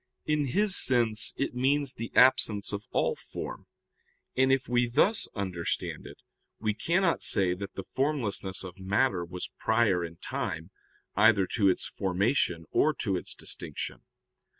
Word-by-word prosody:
In 150 -2 0
his 195 +8 +3
sense 115 -4 +4
it 140 - -2
means 135 +2 +1
the 115 +1 -7
absence 120 -6 +4
of 100 +1 -5
all - - 0
form, - - -8 0.7
and 130 +1 +3
if 135 -1 +1
we 120 0 +1
thus 205 - +2
understand 95 -5 -3
it - - -12 0.4
we 110 -1 0
cannot 170 - +1
say 95 -2 +2
that 100 +2 -7
the 95 - -5
formlessness 115 -9 -2
of 90 0 -10
matter 95 0 +1
was 90 +1 -6
prior 110 -6 +2
in 85 -1 -7
time 80 +2 -5 0.4
either 105 -2 +5
to 100 -4 +3
its 95 - 0
formation 95 - 0
or 155 -1 +2
to 100 -6 -1
its 90 - -2
distinction. - - -5
110 Hz, 150 wpm, -28 LUFS, 95-130 Hz, 0.7 s, either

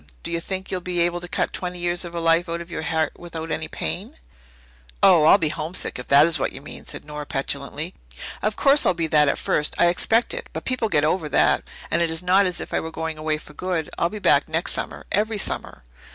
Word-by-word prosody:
Do - - -5
you 170 0 -1
think 190 +2 -4
you'll 185 -1 -1
be 175 0 -2
able 175 0 +1
to 175 - -7
cut - - -1
twenty 180 -1 -4
years 175 +1 -1
of 175 -1 -8
a - - -1
life 165 +1 +2
out 170 0 -2
of 170 0 -9
your - - -3
heart 160 -1 -1
without 165 -2 -6
any 155 +1 -2
pain?" 80 +1 -4 0.9
"Oh, 170 -5 +7
I'll - - +8
be 155 - 0
homesick, 155 -1 -3
if 125 - -8
that 140 +2 +7
is 165 0 +1
what - - -1
you - - -7
mean," 140 - -10
said - - -6
Nora 150 -1 -7
petulantly. 135 0 -3 0.5
"Of 215 0 0
course 280 +1 +5
I'll 185 - +3
be 165 -1 0
that 150 -2 +4
at - - +1
first. 150 - 0
I 175 - +5
expect 225 +6 +1
it - - -6
but - - -5
people 250 -4 -1
get 145 -6 +2
over 155 0 +1
that. - - +3 0.3
And 170 - +2
it 170 - +2
is 160 +2 0
not 190 +2 +4
as 180 - -1
if - - -7
I - - +2
were 160 - -5
going 160 -1 -4
away 155 0 0
for 150 - -14
good. 175 -2 -3
I'll 170 - +2
be 210 - -6
back 205 - +3
next - - 0
summer - - -4
every 215 +1 +1
summer." 190 - -3
170 Hz, 250 wpm, -23 LUFS, 155-180 Hz, 0.9 s, I'll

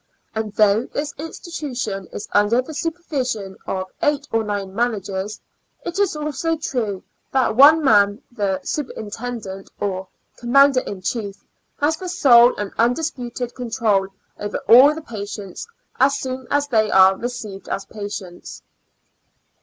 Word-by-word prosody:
And 220 -1 -3
though 215 +3 +3
this= 290 0 -4
institution 260 - -5
is - - -6
under 210 +4 +3
the 260 +5 -4
supervision 275 - -3
of' 185 0 -3
eight 295 -1 +1
or 225 0 +1
nine 200 -2 -3
managers, 205 -3 -2 0.5
it 345 +3 -3
is 400 -5 +2
also 305 +2 -2
true, 225 -11 -3 0.3
that 260 -4 +2
one 300 +5 +7
man, 205 -2 +4
the 200 -5 -1
superintendent 220 -6 -5
or 190 -2 -3 0.3
commander 270 +2 +5
in 195 -6 -7
chief, 205 -1 -4 0.3
has 305 +2 +1
the 365 +2 -6
sole 245 -8 +6
and 205 -1 -4
undisputed 245 -1 -1
control 225 -5 0 0.3
over 205 0 -3
all 270 +6 +8
the 320 - -7
patients 205 - -7 0.3
as 275 +2 +4
soon 260 -1 -5
as 285 0 +1
they 220 -5 +2
are 190 0 +6
received 230 -4 -6
as 195 - -3
patients. 205 -4 -8
235 Hz, 135 wpm, -21 LUFS, 205-280 Hz, 0.5 s, all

